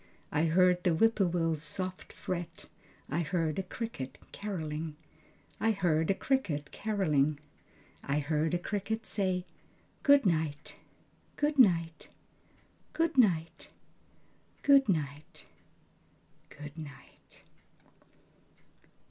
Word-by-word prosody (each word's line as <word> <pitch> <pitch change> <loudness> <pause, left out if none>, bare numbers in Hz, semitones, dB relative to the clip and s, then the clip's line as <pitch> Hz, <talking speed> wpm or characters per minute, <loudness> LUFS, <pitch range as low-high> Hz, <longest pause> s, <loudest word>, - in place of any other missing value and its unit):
I 155 +3 +2
heard 180 +2 +4
the - - +3
whippoorwill's 175 -6 +2
soft 185 +4 -5
fret. 170 -2 -5 0.4
I 150 - -1
heard 165 -1 -1
a - - +2
cricket 190 - -6
carolling, 160 -6 -4 0.6
I 225 0 +2
heard 165 -5 +1
a 195 - +3
cricket 180 - -1
carolling, 155 -9 +1 0.6
I 140 +1 -1
heard 155 +3 0
a - - +3
cricket 210 +4 -3
say: 185 -3 -1 0.6
"Good 285 -3 +5
night, 155 -4 -1 0.6
good 295 -1 0
night, 170 -8 +3 0.9
Good 330 0 +1
night, 170 -10 +2 1.0
good 275 -4 +6
night,... 150 -4 -3 1.0
good 150 +1 -10
night." 145 -4 -13
175 Hz, 95 wpm, -31 LUFS, 155-205 Hz, 1.0 s, good